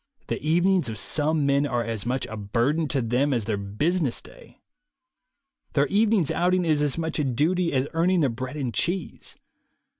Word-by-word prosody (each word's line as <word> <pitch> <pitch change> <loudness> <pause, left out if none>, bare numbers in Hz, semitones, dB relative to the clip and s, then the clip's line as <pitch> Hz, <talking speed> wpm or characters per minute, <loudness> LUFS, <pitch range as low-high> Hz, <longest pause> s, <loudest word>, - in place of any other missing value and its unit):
The - - -2
evenings 175 -1 +2
of 110 - -5
some 155 +2 0
men 140 +1 +2
are 120 -3 -1
as 115 -1 -4
much 130 +1 -1
a 110 - -7
burden 120 +10 0
to 140 -4 -1
them 125 +5 +1
as 115 -4 -1
their 110 -1 -1
business 125 - -1
day. - - -16 1.2
Their 140 -1 +3
evening's 205 -5 +2
outing 180 +1 +1
is 155 -3 +2
as 145 0 0
much 160 -1 -2
a - - +2
duty 165 +7 +1
as 130 0 +1
earning 175 +2 +2
their 140 - +3
bread 130 +5 -6
and 130 -5 -3
cheese. 180 -1 -2
145 Hz, 180 wpm, -25 LUFS, 125-170 Hz, 1.2 s, Their